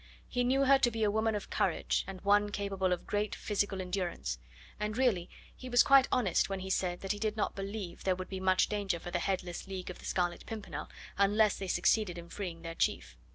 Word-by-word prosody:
He 245 - 0
knew 265 +2 +3
her 270 0 +6
to 255 - +4
be 225 -1 -2
a 210 - +3
woman 220 +1 +1
of 205 - -5
courage, - - +1
and 190 -1 -7
one 205 +1 +4
capable 195 -2 -1
of 180 - -1
great 205 0 -1
physical 205 -2 -1
endurance; 180 - -3 0.4
and 210 +1 -2
really 210 -9 +2 0.3
he 255 - -8
was 245 0 +6
quite 270 -2 +6
honest 205 -9 +2
when 195 -1 -3
he 190 0 -4
said 180 -2 0
that 195 - -2
he 205 - -2
did 215 0 -1
not 210 - 0
believe 195 -2 -5
there 185 -1 +2
would 185 0 -6
be 190 - -5
much 185 0 +3
danger 205 -4 -1
for 175 - -7
the 175 - 0
headless 180 -1 -2
League 185 -1 -5
of - - -11
the - - -11
Scarlet 175 -1 -1
Pimpernel 220 -2 -6 0.3
unless 205 +1 +4
they 195 - -4
succeeded 185 0 +2
in 170 0 -9
freeing 175 -5 -6
their 165 0 -5
chief. 65 - -1
195 Hz, 225 wpm, -32 LUFS, 180-215 Hz, 0.4 s, her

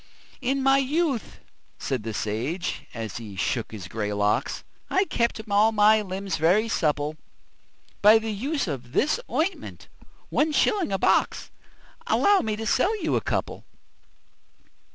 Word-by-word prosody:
"In 270 +2 0
my 270 0 +5
youth," 280 -2 -1 0.4
said 130 -4 -3
the 110 +1 -5
sage, 115 - -3
as 115 -3 -6
he 110 -4 -8
shook 110 +4 -2
his 100 -5 -8
grey 105 +1 -3
locks, 105 +5 0 0.3
"I 380 +1 +2
kept 235 -9 -1
all 210 +2 +4
my 215 0 +5
limbs 195 0 -4
very 180 +8 +3
supple 150 -4 0 0.8
By 210 +2 +8
the 220 0 -3
use 275 +5 -2
of 125 -5 -6
this 305 - +2
ointment 340 +5 -3 0.4
one 305 +1 +1
shilling 385 - +2
a 195 - +1
box - - +1 0.6
Allow 405 -1 +4
me 215 -7 -2
to 225 +1 -5
sell 390 - +1
you 320 - +1
a - - +1
couple?" - - -3
210 Hz, 145 wpm, -25 LUFS, -, 0.8 s, By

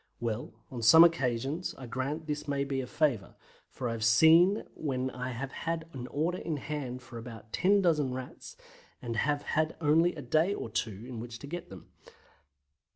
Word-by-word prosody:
Well, 115 -1 -3 0.2
on 125 -3 -5
some 160 +9 +9
occasions 140 0 +1
I 130 - -8
grant 135 +6 -3
this 150 0 -4
may 140 -1 0
be 135 -1 -2
a 125 - -6
favour, 130 -11 0 0.3
for 125 - -4
I - - -1
have 115 -1 -3
seen 160 - +6
when 130 -3 -2
I 125 0 -5
have 130 +2 -5
had 165 -1 -3
an 125 -2 -6
order 165 +7 -1
in 160 -3 -3
hand 130 -4 -5
for 120 -1 -9
about 115 -2 -11
10 200 +2 +3
dozen 150 -6 +2
Rats, 130 0 -8 0.4
and 120 -2 -4
have 145 +5 0
had 155 0 0
only 165 +3 +3
a 150 - -7
day 160 +10 +2
or 115 - -6
two 110 0 -3
in 125 -3 -6
which 115 0 -7
to 140 - -10
get 170 +4 -6
them. 95 -3 -12
135 Hz, 190 wpm, -30 LUFS, 120-160 Hz, 0.4 s, some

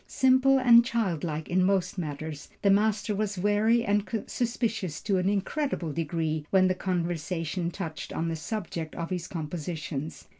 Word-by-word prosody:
Simple 260 +1 +4
and 240 -2 +7
childlike 175 - -2
in 185 +1 +2
most 190 0 +1
matters, 150 -2 -5
the 200 - +5
master 210 +1 +2
was 210 -1 -2
wary 210 +5 +3
and 205 0 +1 0.2
suspicious 225 - -2
to 195 -3 +1
an 180 +1 +1
incredible 205 - -1
degree 160 -1 -1
when 185 -1 +4
the 185 - +2
conversation 175 -1 -2
touched 165 -4 -6
on 165 - -2
the 165 - -1
subject 165 -1 -5
of 170 +1 -4
his 180 -1 -3
compositions. 160 -3 -5
185 Hz, 150 wpm, -28 LUFS, 165-210 Hz, 0.2 s, and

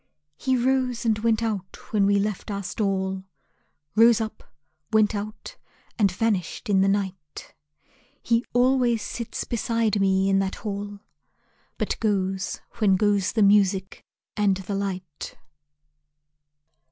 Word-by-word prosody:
He 260 - 0
rose 250 -1 0
and 220 -2 +2
went 225 0 +1
out 200 -5 -3 0.2
when 200 -2 +3
we 200 0 +4
left 205 +1 -2
our 200 -1 -3
stall; 190 -1 -1 0.7
Rose 230 +1 +6
up, 220 -1 -6 0.4
went 215 -1 +4
out, 215 - -6 0.4
and 200 -3 +4
vanished 205 +1 -1
in 190 -1 +4
the 195 - +3
night. 190 -6 -3 0.7
He 230 0 +2
always 245 -2 +3
sits 235 -2 -4
beside 230 -3 0
me 190 0 +3
in 195 0 +3
that 195 0 -1
hall, 205 0 -4 0.8
But - - -2
goes 195 -3 -1 0.2
when 200 -4 +4
goes 205 -1 +1
the 220 -3 +3
music 195 -1 +3 0.3
and 200 -3 +2
the 190 +1 -5
light. 185 -6 -5
205 Hz, 130 wpm, -25 LUFS, 195-225 Hz, 0.8 s, Rose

